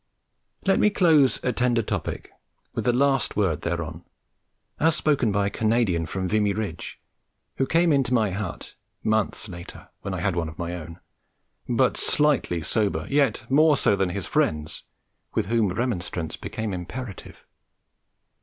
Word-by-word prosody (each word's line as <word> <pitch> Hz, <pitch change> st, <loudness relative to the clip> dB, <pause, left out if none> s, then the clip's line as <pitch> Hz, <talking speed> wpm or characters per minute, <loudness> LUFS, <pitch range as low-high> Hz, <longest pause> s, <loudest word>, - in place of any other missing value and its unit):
Let 195 Hz, -, +3 dB
me 210 Hz, -, +5 dB
close 160 Hz, -9 st, +4 dB
a 125 Hz, -, +1 dB
tender 120 Hz, -2 st, +1 dB
topic -, -, -4 dB, 0.4 s
with -, -, -3 dB
the 125 Hz, -, +4 dB
last 135 Hz, 0 st, +2 dB
word 85 Hz, -7 st, +1 dB
thereon, 85 Hz, -1 st, -3 dB, 0.8 s
as 160 Hz, +1 st, +3 dB
spoken 140 Hz, -10 st, +2 dB
by 100 Hz, 0 st, +1 dB
a -, -, +1 dB
Canadian 110 Hz, -7 st, +1 dB
from 95 Hz, +2 st, -2 dB
Vimy 105 Hz, +1 st, +2 dB
Ridge, 100 Hz, -6 st, -5 dB, 0.6 s
who 135 Hz, -, +1 dB
came 165 Hz, -1 st, +3 dB
into 135 Hz, -3 st, +1 dB
my 110 Hz, -5 st, +2 dB
hut 95 Hz, -3 st, -5 dB, 0.3 s
(months 110 Hz, 0 st, 0 dB
later, 85 Hz, -3 st, -10 dB
when 95 Hz, -, -4 dB
I -, -, -3 dB
had 100 Hz, -2 st, 0 dB
one 85 Hz, -2 st, -1 dB
of 80 Hz, -, -12 dB
my 85 Hz, 0 st, -3 dB
own) 85 Hz, 0 st, -8 dB, 0.7 s
but -, -, +2 dB
slightly 140 Hz, -, +1 dB
sober, 105 Hz, +6 st, 0 dB
yet 140 Hz, -1 st, +2 dB
more 150 Hz, +2 st, +5 dB
so 100 Hz, -, +3 dB
than 95 Hz, -2 st, 0 dB
his 90 Hz, 0 st, -4 dB
friends, 75 Hz, 0 st, -1 dB, 0.5 s
with -, -, +1 dB
whom 110 Hz, -1 st, +2 dB
remonstrance 90 Hz, -6 st, -2 dB
became 110 Hz, -3 st, -4 dB
imperative. 100 Hz, +4 st, -7 dB
105 Hz, 155 wpm, -25 LUFS, 90-130 Hz, 0.8 s, me